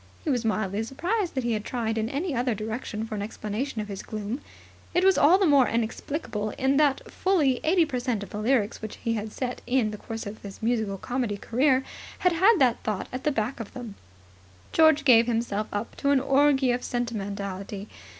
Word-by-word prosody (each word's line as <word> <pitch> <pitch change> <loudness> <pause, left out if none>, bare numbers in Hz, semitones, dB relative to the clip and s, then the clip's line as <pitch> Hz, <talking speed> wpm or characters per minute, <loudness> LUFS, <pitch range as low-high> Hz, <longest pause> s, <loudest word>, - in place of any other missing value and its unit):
He 305 - 0
was 245 -3 0
mildly 215 -2 0
surprised 345 - -2
that 260 - -1
he 235 - 0
had 210 -1 -2
tried 225 -2 -2
in 220 0 -1
any 300 +5 -2
other 245 -1 0
direction 220 +1 -4
for 225 - -7
an 205 - -3
explanation 215 +3 -3
of 210 - -6
his 200 -2 -6
gloom. 215 +5 -5 0.5
It 355 - +4
was 385 0 +6
all 330 +6 +6
the 390 - +2
more 280 -5 +5
inexplicable 225 -1 -2
in 265 +1 +2
that 290 -3 +3
fully 305 -10 +2
80 335 +1 +4
per 265 -5 -3
cent 240 -4 -1
of - - -10
the 210 - -4
lyrics 225 -1 +1
which 215 -1 -6
he 230 - +1
had 215 -1 -3
set 250 +1 -4
in 245 -4 +2
the 210 - -7
course 225 0 -6
of 205 +2 -7
his 200 -1 -9
musical 220 -4 0
comedy 240 -1 -2
career 260 +5 +2 0.3
had 360 -2 +3
had 385 +6 +5
that 255 -6 +3
thought 210 -3 -3
at 255 - -5
the 300 - +3
back 240 0 -2
of 225 - -7
them. 240 -5 -7 0.8
George 315 -2 +5
gave 235 -3 +6
himself 225 -3 -1
up 205 +3 -4
to 280 - 0
an 280 -1 +5
orgy 275 -1 +3
of 245 +1 -1
sentimentality. 200 -4 -4
240 Hz, 210 wpm, -26 LUFS, 215-275 Hz, 0.8 s, was